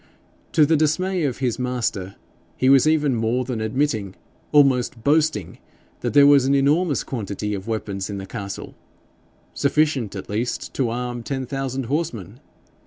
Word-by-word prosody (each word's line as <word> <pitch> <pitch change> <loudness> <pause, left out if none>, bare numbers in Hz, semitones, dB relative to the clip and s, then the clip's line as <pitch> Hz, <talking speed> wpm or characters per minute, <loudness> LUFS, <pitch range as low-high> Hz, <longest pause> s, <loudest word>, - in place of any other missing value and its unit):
To 155 -3 +5
the 160 +2 +3
dismay 165 +3 +1
of 130 -4 -2
his 125 -3 -1
master 115 -7 -2 0.4
he 130 - +3
was 135 +1 +6
even 150 -3 +2
more 115 +3 0
than 120 -3 -3
admitting, 110 -4 -1 0.4
almost 130 -5 +3
boasting, 150 - +1 0.4
that - - -3
there 145 -1 +8
was 140 -2 +6
an 140 +1 +3
enormous 145 +3 +2
quantity 105 -3 -4
of 100 0 -5
weapons 100 -3 -3
in 100 - -4
the 95 - -6
castle 100 -1 -7 0.8
sufficient 140 -7 +1
at 95 - -6
least 115 +4 -3
to 130 -4 0
arm 120 +1 -4
ten 130 +2 -4
thousand 135 0 -3
horsemen! 120 - -3
130 Hz, 155 wpm, -22 LUFS, 110-145 Hz, 0.8 s, there